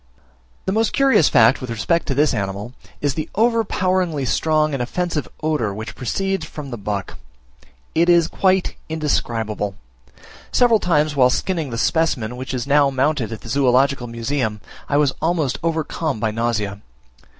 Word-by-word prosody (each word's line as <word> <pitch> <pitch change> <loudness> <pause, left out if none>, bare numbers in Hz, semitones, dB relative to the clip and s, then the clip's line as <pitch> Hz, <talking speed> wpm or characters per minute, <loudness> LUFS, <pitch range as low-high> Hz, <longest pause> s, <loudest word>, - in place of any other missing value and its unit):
The - - 0
most 220 +2 +1
curious 270 - +4
fact 115 +4 +5
with 130 - -6
respect 115 +9 0
to 135 - -1
this 150 +2 +3
animal, 100 +3 -3 0.3
is 145 -2 +1
the 155 +2 -4
overpoweringly 185 - +1
strong 155 +5 +1
and 135 - -1
offensive 165 +4 -2 0.2
odour 145 -11 0
which 110 +2 -6
proceeds 195 +8 -2
from 150 -3 -8
the 120 - -4
buck. 100 -3 -4 0.7
It 170 +2 +3
is 170 -2 +5
quite 190 -1 +1 0.2
indescribable: 115 -10 -1 0.8
several 235 -3 +4
times 155 -4 +1
whilst 125 -2 +4
skinning 165 -7 -2
the 115 - -4
specimen 125 -5 0
which 130 +1 -6
is 125 - -3
now 140 0 +4
mounted 135 -3 0
at 110 - -6
the 115 - -10
Zoological 135 0 +2
Museum, 115 -1 -2 0.3
I 145 - +2
was 145 -2 +3
almost 160 -6 0
overcome 160 -4 -2
by 110 0 0
nausea. 105 -3 -2
140 Hz, 155 wpm, -20 LUFS, 115-165 Hz, 0.8 s, fact